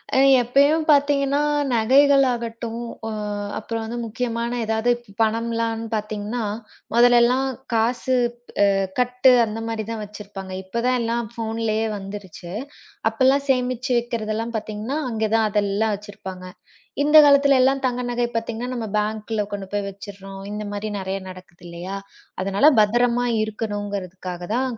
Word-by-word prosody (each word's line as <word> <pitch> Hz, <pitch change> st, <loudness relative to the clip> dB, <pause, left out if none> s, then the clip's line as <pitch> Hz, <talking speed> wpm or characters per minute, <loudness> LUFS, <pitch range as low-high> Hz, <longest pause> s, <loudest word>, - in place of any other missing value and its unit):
அ -, -, +4 dB, 0.2 s
எப்பயும் 280 Hz, +6 st, +3 dB
பார்த்தீங்கன்னா 285 Hz, -1 st, +3 dB, 0.3 s
நகைகளாகட்டும், 240 Hz, -2 st, +2 dB, 0.2 s
அ -, -, -3 dB, 0.5 s
அப்புறம் 225 Hz, +1 st, -4 dB
வந்து 235 Hz, +2 st, -5 dB
முக்கியமான 235 Hz, +1 st, -3 dB
ஏதாவது 220 Hz, +2 st, +1 dB, 0.3 s
பணம்லாம் 230 Hz, 0 st, 0 dB
பார்த்தீங்கன்னா, 215 Hz, +2 st, -3 dB, 0.5 s
மொதல்லெல்லாம் 245 Hz, +2 st, +5 dB, 0.3 s
காசு 240 Hz, +3 st, +1 dB, 0.5 s
அ -, -, +3 dB, 0.3 s
கட்டு 250 Hz, +1 st, +4 dB
அந்த 220 Hz, +1 st, -5 dB
மாதிரிதான் 225 Hz, -1 st, -4 dB
வச்சிருப்பாங்க. 200 Hz, -2 st, -9 dB
இப்ப 210 Hz, +5 st, -3 dB
தான் 255 Hz, -, +3 dB
எல்லாம் 230 Hz, -1 st, -2 dB
ஃபோன்லயே 225 Hz, -1 st, -1 dB
வந்துருச்சு. 195 Hz, -3 st, -8 dB, 0.6 s
அப்பல்லாம் 265 Hz, +5 st, +2 dB
சேமிச்சு 255 Hz, 0 st, 0 dB
வைக்கிறது 230 Hz, -2 st, -3 dB
எல்லாம் 230 Hz, +2 st, -3 dB
பார்த்தீங்கன்னா, 215 Hz, +5 st, -4 dB
அங்க 220 Hz, -1 st, -2 dB
தான் 220 Hz, -1 st, +3 dB
அதெல்லாம் 205 Hz, +1 st, +1 dB
வச்சிருப்பாங்க. 195 Hz, -2 st, -9 dB, 0.6 s
இந்தக் 300 Hz, +1 st, +8 dB
காலத்துல 280 Hz, -1 st, +5 dB
எல்லாம் 270 Hz, +1 st, +2 dB
தங்க 250 Hz, 0 st, -2 dB
நகை 240 Hz, 0 st, 0 dB
பார்த்தீங்கன்னா 230 Hz, +1 st, -3 dB
நம்ம 235 Hz, -2 st, -3 dB
பேங்க்ல 215 Hz, +1 st, -1 dB
கொண்டு 200 Hz, -1 st, -4 dB
போய் 205 Hz, -1 st, -1 dB
வச்சிர்றோம். 195 Hz, 0 st, -10 dB
இந்த 210 Hz, 0 st, -4 dB
மாதிரி 205 Hz, +1 st, -3 dB
நெறைய 190 Hz, +1 st, -3 dB
நடக்குது 185 Hz, -1 st, -13 dB
இல்லையா? 175 Hz, +3 st, -6 dB, 0.5 s
அதனால 195 Hz, +8 st, +1 dB, 0.2 s
பத்திரமா 240 Hz, +3 st, +2 dB, 0.2 s
இருக்கணுங்குறதுக்காகதான் 205 Hz, +1 st, -4 dB
225 Hz, 125 wpm, -22 LUFS, 205-245 Hz, 0.6 s, இந்தக்